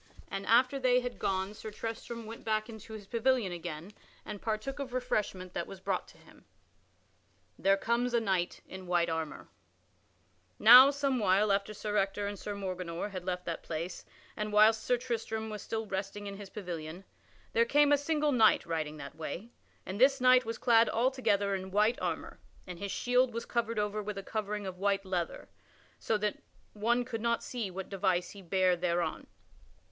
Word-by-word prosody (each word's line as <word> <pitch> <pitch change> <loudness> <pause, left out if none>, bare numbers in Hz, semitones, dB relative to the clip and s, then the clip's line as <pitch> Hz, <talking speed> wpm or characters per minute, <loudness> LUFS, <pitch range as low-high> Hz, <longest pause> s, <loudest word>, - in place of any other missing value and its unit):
And 195 0 -4
after 250 +4 +4
they 250 -1 +3
had 245 0 -5
gone 190 +1 -1
Sir 215 - -8
Tristram 225 +2 -6
went 225 +1 -9
back 215 -1 0
into 220 -1 -10
his 215 -2 -8
pavilion 230 -1 +1
again 170 +1 -6 0.3
and 210 -2 -7
partook 225 +5 -3
of 265 -3 -5
refreshment 205 -7 -2
that 170 - -3
was 195 - -9
brought - - -2
to - - -17
him. - - -19 1.1
[Sidenote: - - -40
There 195 0 +4
comes 235 +4 0
a - - +5
knight 190 -5 -1
in 190 -1 -9
white 175 -1 +2
armor] 160 -2 -4 1.1
Now, 250 +5 +10
some 280 -2 0
while 205 0 +3
after 200 +1 +1
Sir 210 +1 -2
Ector 195 +1 0
and 200 -1 -4
Sir 205 - -5
Morganor 185 -2 -4
had 185 -2 -5
left 180 -1 -3
that 165 - -3
place, 170 +2 -5 0.3
and 210 0 -3
whilst 215 +1 +5
Sir 250 - +2
Tristram 225 -3 -3
was 210 - -5
still 225 0 -3
resting 195 +1 -4
in 200 -1 -6
his 200 -1 -9
pavilion, 175 -3 -6 0.5
there 230 - +5
came 290 +4 +4
a - - +8
single 300 0 +1
knight 225 -5 +4
riding 155 -2 -3
that 140 0 -9
way, 170 +8 -6 0.3
and 195 +4 -5
this 270 +1 +6
knight 255 0 +6
was 225 0 -4
clad 230 -2 +4
altogether 225 -5 +1
in 190 -1 -3
white 210 +5 +2
armor - - -3 0.3
and 180 -2 -8
his 200 0 -4
shield 250 -1 +2
was 230 - -3
covered 230 -1 -1
over 210 0 -1
with 210 -1 -5
a 195 - -5
covering 210 -1 -3
of 185 -1 -6
white 200 0 +1
leather, 180 -3 -3 0.5
so 220 - 0
that 210 0 -2 0.3
one 235 +4 +1
could 230 -3 -4
not 235 0 0
see 235 -6 -4
what 190 +1 -6
device 185 -2 0
he 200 - -11
bare 185 0 +2
thereon. 170 -2 -1
210 Hz, 185 wpm, -31 LUFS, 190-235 Hz, 1.1 s, Now